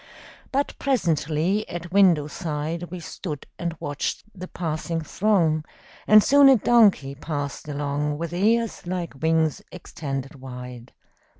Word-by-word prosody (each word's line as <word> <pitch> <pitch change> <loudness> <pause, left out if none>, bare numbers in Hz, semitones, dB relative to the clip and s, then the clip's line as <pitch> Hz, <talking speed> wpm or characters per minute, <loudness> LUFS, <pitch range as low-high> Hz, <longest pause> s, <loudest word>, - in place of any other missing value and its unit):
But 280 +1 0
presently 175 - 0
at 175 0 -6
window 180 -6 +5
side 155 +1 -4
We 180 +1 -6
stood 160 -3 -7
and 170 -2 -3
watched 145 0 -3
the 185 -2 -8
passing 165 -1 -3
throng, 165 -3 +1 0.4
And 215 -1 +8
soon 280 0 +7
a 265 - +7
donkey 205 - +4
passed 145 -1 -5
along 145 0 -2
With 170 +1 -4
ears 220 +2 +1
like 175 -6 -4
wings 160 -1 +1
extended 140 -5 -6
wide. 125 -1 -9
165 Hz, 125 wpm, -24 LUFS, 145-190 Hz, 0.4 s, And